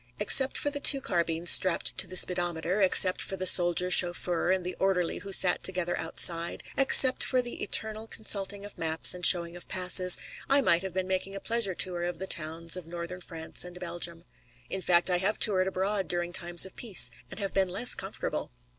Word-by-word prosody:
Except 265 +6 +2
for 290 - -3
the 285 - -6
two 280 -1 +6
carbines 170 -6 0
strapped 185 -2 +3
to 195 - +1
the 185 - -9
speedometer, 175 +1 +1
except 185 -1 +3
for 195 - -5
the 185 - -5
soldier 180 0 +3
chauffeur 175 -1 +2
and 185 -1 -3
the 180 - -6
orderly 185 -3 -2
who 200 - -11
sat 185 -1 +4
together 180 -2 -1
outside, 165 +1 +1
except 265 -1 +5
for 255 - -1
the 245 -1 -7
eternal 220 +1 -3
consulting 200 -2 -4
of 205 - -13
maps 160 0 +1
and 180 0 -11
showing 170 0 +4
of 175 - -12
passes, 180 0 +3 0.3
I 275 +1 +2
might 170 -10 0
have 190 -2 -9
been 185 -1 -4
making 190 +1 -5
a - - -7
pleasure 225 -4 -3
tour 175 -1 0
of 175 -1 -6
the 190 - -5
towns 165 -1 -3
of 180 -3 -10
Northern 175 +2 -9
France 165 -2 -6
and 180 0 -12
Belgium. 170 -1 -6 0.5
In 190 - -6
fact, 175 0 0
I 180 - -1
have 195 +4 -3
toured 190 -4 +3
abroad 190 0 -4
during 175 +1 -4
times 175 0 +2
of 190 - -14
peace 220 -6 +1 0.2
and - - -11
have 195 -2 -5
been 190 -1 -1
less 205 +7 +1
comfortable. - - -6
185 Hz, 200 wpm, -26 LUFS, 175-195 Hz, 0.5 s, two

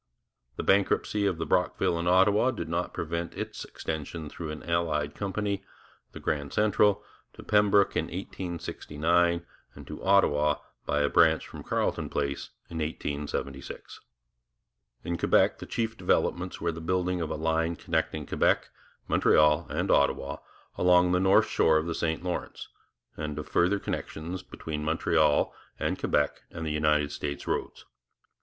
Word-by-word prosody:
The - - -4
bankruptcy 100 +1 +2
of 95 -4 0
the - - -2
Brockville 85 - +1
and 85 - -2
Ottawa 100 +6 +4
did 85 -10 -4
not 85 +2 -2
prevent 85 +1 -4
its - - -5
extension 80 0 -5
through 80 +1 -6
an 75 +1 -7
allied 80 -4 0
company, 100 0 -2 0.5
the - - -9
Canada 70 -2 -2
Central, 105 -1 +3 0.3
to - - -12
Pembroke 105 -1 +3
in - - +1
1869 85 -1 -1 0.3
and - - -11
to 75 - -8
Ottawa, 75 -7 +4 0.3
by 75 - +1
a 70 - +3
branch 80 0 +4
from - - -9
Carleton - - -1
Place, 70 -1 -2 0.2
in 80 - -6
1876. 70 -3 -4 1.0
In 85 -1 -3
Quebec - - +3
the - - -8
chief 115 -1 -2
developments 90 -1 0
were 85 0 0
the 80 0 -8
building 90 +1 0
of 80 - -2
a 80 - -2
line 80 +1 0
connecting 80 -3 -2
Quebec, - - +1 0.4
Montreal, 75 +1 +4
and - - -1
Ottawa 70 0 +2 0.4
along 90 0 +5
the 90 - +3
north 95 +1 +5
shore 80 -1 +3
of 80 - 0
the 85 - -2
St 80 0 -1
Lawrence, 90 -1 -4 0.5
and 75 -1 -4
of 75 - -5
further 90 +4 +2
connections 90 -1 -5
between 75 -1 -6
Montreal 75 -1 +2 0.2
and - - -2
Quebec 75 0 0
and 80 -1 -6
United 75 -1 +1
States 70 0 -4
roads. - - -3
85 Hz, 150 wpm, -28 LUFS, 75-90 Hz, 1.0 s, along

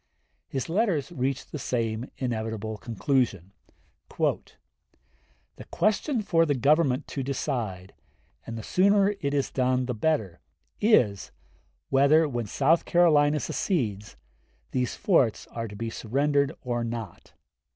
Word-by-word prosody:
His 135 -2 -3
letters 180 - 0
reached 135 -3 -3
the 150 - -5
same 115 -1 -2
inevitable 110 -3 -3
conclusion: 115 - -1 0.7
"The - - 0 1.2
question 215 +3 0
for 165 -4 +3
the 145 -3 +1
Government 140 0 +2
to 140 - -3
decide 120 -9 -3 0.5
and 115 - -5
the 110 - -6
sooner 200 - +3
it 140 0 -1
is 140 - 0
done 130 -1 +1
the 125 - -2
better 110 - -1 0.4
is, 120 - +3 0.6
whether, 140 +4 +4
when 120 -5 -3
South 150 +9 +2
Carolina 150 -4 +4
secedes, 105 - -2 0.5
these 125 -1 -1
forts 135 - +2
are 115 -1 -4
to 105 - -10
be 115 +2 -4
surrendered 140 +5 0
or 120 -1 -2
not. 115 -4 -6
130 Hz, 120 wpm, -26 LUFS, 115-150 Hz, 1.2 s, whether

